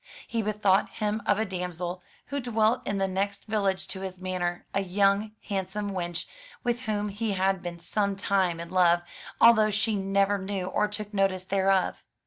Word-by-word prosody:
He 230 - -1
bethought 210 -2 +2
him 215 0 -1
of 205 - +4
a 220 - +1
damsel 180 -1 -4 0.3
who 280 - -2
dwelt 230 -1 +2
in 200 - 0
the 195 0 +1
next 200 +1 -2
village 195 -3 0
to 190 0 -4
his 185 -1 -6
manor, 180 -1 -2
a 195 - +2
young 200 +3 +2
handsome 200 +1 -3
wench 175 -2 -3 0.4
with 240 -1 0
whom 210 -1 -1
he 210 +1 -2
had 190 -1 +1
been 175 -1 -5
some 200 +4 -1
time 190 -3 +1
in 170 +1 -7
love, 175 -2 +4 0.4
although 220 -2 +7
she 215 +2 +1
never 195 +1 +2
knew 190 -1 -3
or 190 +2 +1
took 210 0 -5
notice 195 -2 +1
thereof. 190 0 +1
195 Hz, 175 wpm, -27 LUFS, 185-210 Hz, 0.4 s, although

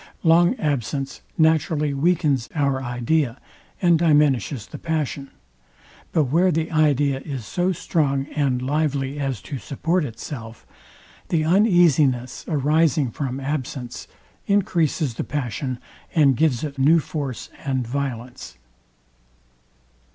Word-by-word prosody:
Long 175 +6 +5
absence 140 -1 -2 0.2
naturally 155 -2 +2
weakens 145 -4 +1
our 140 -3 +1
idea, 125 +1 0 0.5
and 170 -2 +5
diminishes 145 -6 +2
the - - -10
passion: 150 -4 -3 0.8
But 160 - +3
where 170 +8 +2
the 160 +1 -1
idea 145 -3 +2
is 135 -5 -6
so 180 - 0
strong 140 -5 0
and 135 -4 0
lively 145 -1 -1
as 135 -8 -3
to 140 -4 -6
support 165 +7 -1
itself, 115 -2 -7 0.6
the 155 -2 +1
uneasiness, 160 - +3
arising 150 -2 +2
from 135 +1 -4
absence, 135 -3 -4 0.4
encreases 170 - +1
the - - -4
passion 130 -2 -3 0.4
and 140 -5 +5
gives 145 -3 +1
it 140 -3 -5
new 150 +5 +5
force 140 -5 -5
and 130 -3 -1
violence. 125 - -5
145 Hz, 115 wpm, -23 LUFS, 130-160 Hz, 0.8 s, Long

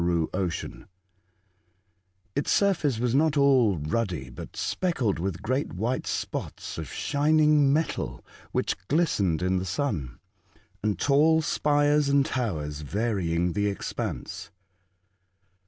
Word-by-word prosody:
Its 145 - 0
surface 165 - +2
was 120 +1 0
not 155 +2 +3
all 130 -9 +4
ruddy, 80 - -2
but - - -9
speckled 130 - -1
with 90 0 -3
great 130 +6 -1
white 115 +8 -2
spots - - -4
of 80 - -6
shining 150 -1 +3
metal, 155 +3 -1 0.3
which - - 0
glistened 100 - +1
in 95 +1 +1
the 90 - -1
sun, 90 - -2 0.6
and 105 -3 0
tall 150 - +4
spires 145 -1 +2
and 140 -1 +4
towers 75 - -2
varying 90 -1 -1
the 105 0 +1
expanse. 100 - -4
120 Hz, 105 wpm, -27 LUFS, 90-145 Hz, 0.6 s, all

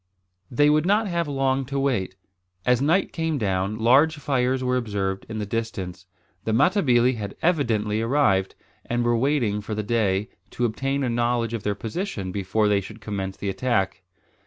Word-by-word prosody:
They 145 +4 +4
would 155 +3 +2
not 210 +2 +3
have 170 -3 -1
long 135 -1 0
to 140 +1 -3
wait. 120 -10 0 0.5
As 125 0 +3
night 170 +7 +2
came 160 -2 -1
down, 100 -2 -1
large 135 +8 +4
fires 130 -2 0
were 125 0 +1
observed 100 -5 -2
in 110 - -4
the 105 - -2
distance. 95 -5 -4 0.4
The 110 - -1
Matabili 130 - +3
had 100 -2 -5
evidently 110 -10 +1
arrived, 115 -7 +2 0.3
and 120 0 -1
were 120 - +3
probably 115 -1 +1
waiting 125 -7 +1
for 105 +1 -5
day, 105 -2 0 0.2
to 120 - -1
obtain 135 +5 -1
a - - 0
knowledge 120 -1 0
of 115 - -2
their 100 +1 -1
position 110 - -4
before 100 +2 0
they 100 -1 +2
should 110 +3 -10
commence 95 -2 -4
the 100 - -3
attack. 100 -3 0
115 Hz, 175 wpm, -24 LUFS, 105-135 Hz, 0.5 s, They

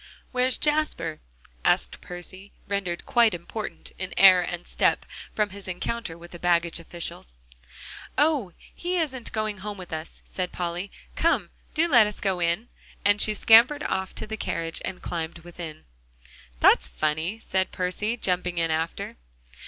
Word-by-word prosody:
"Where's 255 0 +2
Jasper?" 300 - 0 0.4
asked - - +2
Percy, 185 +3 -8 0.2
rendered 195 -4 -2
quite 235 -5 +4
important 195 +6 -6
in 185 0 -4
air 185 -2 +9
and 175 0 -4
step, - - +1 0.3
from 210 -2 +1
his 200 0 -9
encounter 185 0 -3
with 175 +1 -12
the 175 - -9
baggage 170 -1 +2
officials. 165 - -8 0.8
"Oh! 290 - +3 0.2
he 360 +1 -2
isn't 265 -8 -2
going 215 -2 -2
home 205 +1 -5
with 180 -3 -8
us," 160 +1 -6
said 180 -1 -3
Polly. 175 +2 -3 0.3
"Come, 335 +1 +2 0.2
do 330 +2 +4
let 240 -9 +7
us 210 - -6
get 195 -2 +1
in," 175 +6 0 0.4
and 205 +1 +4
she 215 - +2
scampered 240 +8 +6
off 190 0 -2
to - - -4
the 220 0 -5
carriage 165 -4 -2
and 180 - -5
climbed 165 -1 -3
within. 170 - -8 0.8
"That's 65 0 +6
funny," 155 - -1
said 190 -4 -1
Percy, 205 +5 -1
jumping 180 -4 0
in 165 -1 +2
after. 160 +1 -2
185 Hz, 150 wpm, -26 LUFS, 170-220 Hz, 0.8 s, air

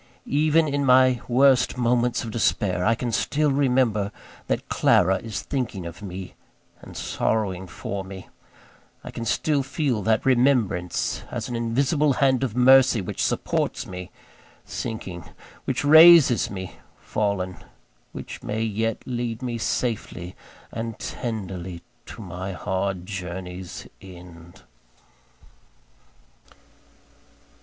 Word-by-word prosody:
Even 155 +2 +2
in 140 0 -1
my 130 -2 +5
worst 130 +1 +4
moments 120 0 +1
of 115 - -6
despair, 95 -5 0
I 115 +3 +3
can 120 +1 -3
still 145 +6 +1
remember 125 -7 +1 0.4
that - - -2
Clara 95 +2 +3
is 110 -2 -6
thinking 120 -10 -3
of 85 - -8
me 95 -2 -7 0.5
and - - -11
sorrowing 95 -4 -1
for 95 +3 -5
me: 95 -1 -10 0.8
I - - -8
can 115 - -6
still 145 +6 +1
feel 135 -4 -1
that 110 +2 +1
remembrance, 120 -9 +1
as - - -4
an 120 - -3
invisible 135 +6 +1
hand 130 -1 +2
of 120 -4 -2
mercy 130 -1 +6
which 95 - -3
supports - - -1
me, 90 -1 -8 0.6
sinking; 95 -7 -5 0.4
which - - -1
raises 160 - +8
me, 95 -2 -7 0.2
fallen; 95 -4 -2 0.5
which - - -8
may 110 +1 -2
yet 110 0 -2
lead 120 -1 -3
me 120 -2 -3
safely 105 -5 -3 0.4
and 115 0 -5
tenderly 95 -6 -5 0.2
to 110 - -9
my 90 +1 -6
hard 95 0 -2
journey's 90 -1 -7 0.2
end. 85 -2 -13
110 Hz, 115 wpm, -24 LUFS, 95-130 Hz, 0.8 s, raises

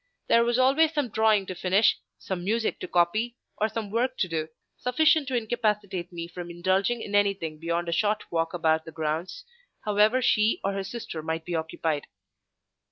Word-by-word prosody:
There 235 - +6
was 240 +1 +1
always 275 +5 +4
some 290 -5 0
drawing 215 -2 +3
to 185 - -5
finish, 190 +4 +3 0.2
some 185 -2 -5
music 220 +4 0
to - - -5
copy, 215 +8 +1 0.2
or 215 - +1
some 220 -2 -5
work 250 +3 0
to 185 - +1
do, 160 -2 -2 0.3
sufficient 300 +3 +3
to 260 -2 0
incapacitate 210 -6 -1
me 170 -1 -5
from 175 0 -8
indulging 190 +7 0
in 205 - -7
anything 195 -6 +1
beyond 170 +1 -2
a - - -1
short 210 +4 +1
walk 165 -1 0
about 160 -2 +1
the 160 - -8
grounds, 160 - -3 0.4
however 210 +3 +3
she 225 -3 +3
or 195 - 0
her 195 0 -2
sister 195 -6 -6
might 160 +1 -3
be 175 - -4
occupied. 160 -2 -2
200 Hz, 180 wpm, -27 LUFS, 170-230 Hz, 0.4 s, There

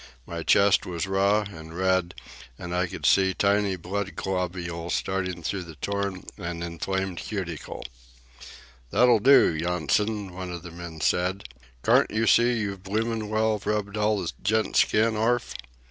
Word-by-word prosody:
My 85 0 -5
chest 100 +4 +4
was 85 -1 -2
raw 100 +2 +2
and 80 -3 -10
red, 95 -1 +1 0.4
and 90 -1 -6
I 90 +1 +1
could - - -7
see 95 -1 +4
tiny 100 -1 +2
blood 95 +3 -4
globules 90 -2 -3
starting 90 -2 -2
through 95 +4 -2
the 80 -2 -11
torn 100 +4 -3
and 85 0 -4
inflamed 95 +1 -3
cuticle. 90 -7 -5 1.1
"That'll 120 - +5
do, 135 -5 +6
Yonson," 90 +5 -1
one 90 0 -6
of 85 -1 -7
the 85 - -9
men 85 -2 -9
said. 90 +4 +1 0.4
"Carn't - - +4
yer 110 +1 0
see 120 +2 +5
you've 100 -4 -3
bloomin' 110 +2 -2
well 110 -1 +1
rubbed 105 -1 -2
all 105 0 +1
the - - -3
gent's 110 +1 +1
skin 110 +1 +3
orf?" 120 +3 0
95 Hz, 150 wpm, -26 LUFS, 90-105 Hz, 1.1 s, do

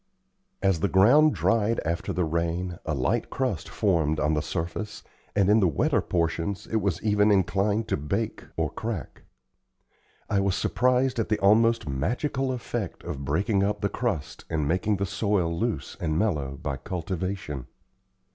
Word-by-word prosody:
As 95 -4 +3
the 100 - +2
ground 125 +12 +5
dried 115 0 +2
after 85 +2 -2
the 90 - 0
rain, 85 +2 -2
a 80 - 0
light 65 0 0
crust - - -2
formed 80 -6 +1
on 75 +1 +2
the 75 - +1
surface, 90 +7 -4 0.3
and 100 -2 +3
in 105 +2 +5
the 95 - +4
wetter 75 - +1
portions 85 +4 -1
it 110 - -1
was 100 -5 0
even 105 -1 +3
inclined 100 +2 +2
to - - +1
bake 75 0 -2
or - - 0
crack. 110 -8 -5 1.1
I 100 - +1
was 100 -1 +1
surprised 125 +4 +1
at 115 - -1
the 105 - +2
almost 115 +1 +4
magical 125 - -1
effect 120 -6 -4
of 75 -5 -5
breaking 95 +8 +1
up 100 +1 0
the 100 - +1
crust 95 - -3
and 75 -3 0
making 95 +5 +1
the 100 - 0
soil 100 -4 0
loose 105 - -2
and 80 -2 0
mellow 75 -9 0
by 70 -2 -2
cultivation. 85 -3 -4
95 Hz, 160 wpm, -26 LUFS, 80-110 Hz, 1.1 s, ground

